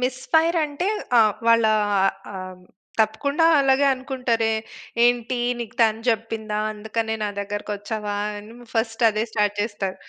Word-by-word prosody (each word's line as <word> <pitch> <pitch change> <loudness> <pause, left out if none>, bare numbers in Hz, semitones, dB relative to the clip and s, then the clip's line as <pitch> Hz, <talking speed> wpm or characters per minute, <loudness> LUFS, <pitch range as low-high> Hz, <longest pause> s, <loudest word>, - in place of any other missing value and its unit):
Miss 255 0 -1
fire 330 +1 +4
అంటే 300 +5 -2 0.3
ఆ! - - +8 0.3
వాళ్ళా 230 -1 +5 0.6
ఆహ్, 185 -1 -8 0.4
తప్పకుండా 280 +9 +1 0.2
అలాగే 270 +1 +3
అనుకుంటారే, 250 -4 -1 0.5
"ఏంటి 245 0 +1 0.2
నీకు 230 -1 -7
తను 220 0 +2
చెప్పిందా? 220 -1 -3
అందుకనే 220 +1 -3
నా 205 - -1
దగ్గరకి 205 +1 -4
వచ్చావా?" 205 0 -4 0.2
అని 215 +3 -12 0.2
ఫస్ట్ 225 +1 0
అదే 215 +1 -1
స్టార్ట్ 210 -1 +1
చేస్తారు. 205 -3 -3
225 Hz, 130 wpm, -23 LUFS, 210-250 Hz, 0.6 s, ఆ